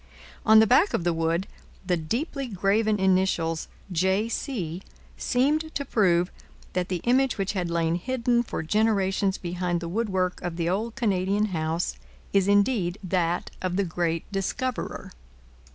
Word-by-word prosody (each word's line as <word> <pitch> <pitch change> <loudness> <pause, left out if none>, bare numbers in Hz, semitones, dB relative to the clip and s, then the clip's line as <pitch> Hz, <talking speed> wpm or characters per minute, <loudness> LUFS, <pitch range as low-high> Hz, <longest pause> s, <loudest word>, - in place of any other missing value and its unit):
On 220 0 +8
the 220 - +8
back 260 - +4
of - - -1
the 175 0 +1
wood, 165 +3 0 0.4
the 180 -1 +2
deeply 255 - -3
graven 210 +1 +1
initials 185 -4 +1 0.2
J. 190 +5 +1
C. 185 - -3 0.3
seemed 300 +5 0
to 280 - -1
prove 180 -7 +2 0.4
that 180 -1 -1
the 180 -3 -2
image 255 +1 +2
which 195 0 -1
had 180 -4 -2
lain 165 -1 +1
hidden 240 +5 +1
for 230 - -4
generations 195 0 +1
behind 175 0 -2
the 170 - -5
woodwork 190 -2 -1
of 175 -2 -4
the 170 -1 -1
old 215 +6 -1
Canadian 205 -3 +1
house 160 +1 -1 0.4
is 195 -1 +3
indeed 200 -3 +2
that 175 -1 0
of 185 -1 -1
the 200 0 +1
great 165 -1 -1
discoverer. 215 +6 -3
190 Hz, 150 wpm, -26 LUFS, 175-220 Hz, 0.4 s, On